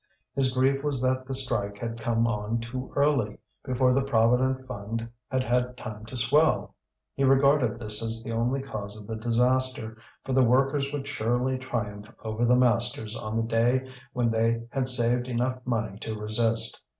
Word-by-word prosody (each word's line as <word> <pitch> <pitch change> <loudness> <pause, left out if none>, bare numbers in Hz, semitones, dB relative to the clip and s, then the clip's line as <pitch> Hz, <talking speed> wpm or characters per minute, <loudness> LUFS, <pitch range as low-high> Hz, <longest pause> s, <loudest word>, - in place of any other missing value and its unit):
His 135 -2 +3
grief 135 +2 +1
was 145 -3 0
that 130 0 0
the 135 - -2
strike 100 -6 0
had 115 +1 -5
come 115 0 +1
on 110 0 -1
too 125 +3 -6
early, 140 -7 +1 0.3
before 130 -1 +2
the 135 - +2
Provident 130 +1 +2
Fund 115 -1 -5 0.2
had 130 -1 0
had 125 +1 0
time 110 -3 -8
to 125 - -5
swell. 145 +7 +3 0.4
He 140 - -1
regarded 135 -1 +4
this 105 -2 0
as 115 0 -3
the 115 - -5
only 120 +4 0
cause 105 -5 -6
of 105 - -11
the 110 - -5
disaster, 120 0 +1 0.3
for 135 - -2
the 130 - +4
workers 135 +3 +2
would 145 -1 -4
surely 125 +1 0
triumph 110 -4 -5
over 110 +2 -1
the 125 +1 +5
masters 120 -3 +2
on 110 -1 -5
the 115 - +1
day 120 +3 +1 0.2
when 120 -2 0
they 115 +1 +1
had 135 -2 -1
saved 120 0 +2
enough 125 +1 -1
money 110 -5 -2
to 110 0 -5
resist. 110 +1 0
120 Hz, 175 wpm, -27 LUFS, 115-130 Hz, 0.4 s, the